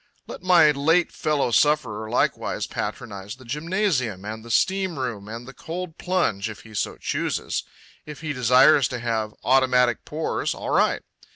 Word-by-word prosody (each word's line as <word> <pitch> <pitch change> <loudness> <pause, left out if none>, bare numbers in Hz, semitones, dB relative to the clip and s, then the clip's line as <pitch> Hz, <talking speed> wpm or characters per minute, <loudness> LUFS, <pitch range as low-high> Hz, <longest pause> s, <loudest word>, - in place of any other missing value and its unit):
Let - - -9
my 175 -4 +6
late 160 +5 +2
fellow 150 -5 0
sufferer 125 -5 +2
likewise 120 - 0
patronize 100 -1 -5
the 130 0 -16
gymnasium 150 - -1
and 110 +1 -6
the 115 - -11
steam 190 +6 +1
room 120 -6 -4
and 115 +3 -7
the 135 - -10
cold 165 +3 -7
plunge 115 - 0
if 110 - -9
he 110 - -15
so 100 - -2
chooses. - - -2 0.5
If 150 0 -9
he 155 -2 -3
desires 125 +2 +5
to 125 - -5
have 110 -2 -2
automatic 125 -2 +3
pores, 155 +1 -2
all - - -5
right. - - +2
130 Hz, 160 wpm, -24 LUFS, 110-155 Hz, 0.5 s, my